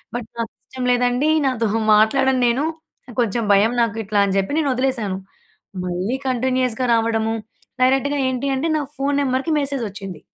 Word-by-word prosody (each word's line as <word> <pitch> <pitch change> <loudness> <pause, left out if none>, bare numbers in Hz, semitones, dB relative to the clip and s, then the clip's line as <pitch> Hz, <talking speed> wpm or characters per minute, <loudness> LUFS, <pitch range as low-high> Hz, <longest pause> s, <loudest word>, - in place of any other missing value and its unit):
But, 235 -2 -4
నాకు 230 - -3
ఇష్టం 255 -1 -6
లేదండి, 245 +4 +2 0.2
నాతో 235 -4 0 0.3
మాట్లాడను 260 +4 +3
నేను 240 +4 +1 0.6
కొంచెం 230 +1 0
భయం, 210 +4 +4
నాకు 225 -2 -2
ఇట్లా 205 0 +2
అని 190 - -1
చెప్పి 195 +10 -2
నేను 290 - +1
వదిలేసాను. 250 -7 -1 0.7
మళ్ళీ 185 +8 -2
కంటిన్యూయస్‌గా 255 -1 0
రావడము 225 -1 0 0.5
డైరెక్ట్‌గా 270 +2 +2
ఏంటి, 260 +1 -2
అంటే 315 +5 -1
నా 295 - -1
ఫోన్ 280 +1 0
నెంబర్‍కి 270 +4 0
మెసేజొచ్చింది. 215 - -5
245 Hz, 145 wpm, -21 LUFS, 220-265 Hz, 0.7 s, భయం